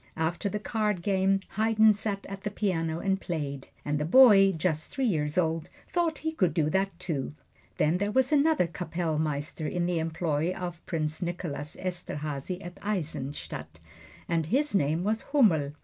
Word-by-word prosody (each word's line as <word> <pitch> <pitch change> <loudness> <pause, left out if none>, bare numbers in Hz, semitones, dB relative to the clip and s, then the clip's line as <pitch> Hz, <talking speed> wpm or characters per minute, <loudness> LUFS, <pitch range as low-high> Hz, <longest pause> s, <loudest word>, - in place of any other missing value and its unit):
After 170 +5 -1
the 210 - -2
card 210 -3 -1
game 195 0 +2 0.2
Haydn 220 0 +5
sat 205 -1 -3
at 195 0 -7
the 210 - -2
piano 165 -6 -1
and 195 +2 0
played, 140 -5 -4 0.2
and 145 0 0
the - - 0
boy, 195 +1 +7
just 160 -2 -1
three 270 -2 -1
years 150 -8 0
old, 165 -2 0 0.2
thought 340 -3 +1
he 320 - +1
could 185 - +1
do 155 -3 +2
that, 195 +2 0
too. 145 -5 -3 0.4
Then 160 +4 +2
there 205 +1 0
was 260 +5 +2
another 300 - +4
Kappellmeister 160 -2 -2
in 175 +2 -1
the 175 -1 0
employ 160 +1 -1
of 175 -2 -6
Prince 155 -1 -2
Nicholas 170 -4 -4
Esterhazy 175 -1 -4
at 175 +1 -9
Eisenstadt, 165 -8 -4 0.5
and 165 -2 0
his 280 - +1
name 160 -2 +1
was 220 +3 0
Hummel. 160 - +4
175 Hz, 165 wpm, -28 LUFS, 155-205 Hz, 0.5 s, boy